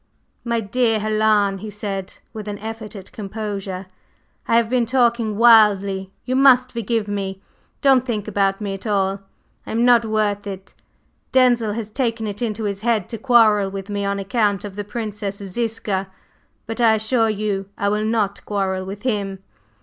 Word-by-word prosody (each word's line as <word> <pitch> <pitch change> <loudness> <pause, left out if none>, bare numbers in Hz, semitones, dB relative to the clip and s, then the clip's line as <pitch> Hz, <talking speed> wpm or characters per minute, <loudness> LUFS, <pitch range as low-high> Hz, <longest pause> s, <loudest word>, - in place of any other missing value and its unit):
"My 235 -1 0
dear 225 +2 +1
Helen," 215 -2 +2
he 215 +2 -7
said, 200 -2 -5 0.2
with 215 -1 -7
an 205 0 -4
effort 220 0 -7
at 195 -2 -10
composure, 200 -2 -5 0.6
"I 230 - +4
have 235 -1 +3
been 245 -1 +1
talking 235 -4 +1
wildly; 200 -4 +5
you 255 - -1
must 255 -2 +5
forgive 230 -2 -1
me! 195 -2 -3 0.4
Don't 265 -3 +5
think 220 -5 -3
about 195 -1 +1
me 205 -2 -3
at 195 +3 -7
all; 195 -1 +1 0.5
I - - -7
am 230 +2 +2
not 240 -1 +6
worth 210 -2 -1
it! 195 -1 -8 0.6
Denzil 240 -4 +3
has 215 -1 -5
taken 230 -2 -1
it 205 +1 -5
into 220 -2 -2
his 200 -1 -3
head 225 -5 0
to 230 - -6
quarrel 220 -5 +4
with 195 +1 -7
me 200 0 -2
on 200 0 -1
account 205 -1 0
of 200 -2 -8
the 205 - -4
Princess 210 -2 -4
Ziska, 200 -1 -3 0.6
but 225 +2 -4
I 225 -2 +5
assure 225 +1 +1
you 200 -2 -2
I 200 - 0
will 210 +1 0
not 215 -2 -1
quarrel 190 -2 -1
with 195 +2 -8
him. 200 -6 -2
210 Hz, 175 wpm, -21 LUFS, 200-230 Hz, 0.6 s, not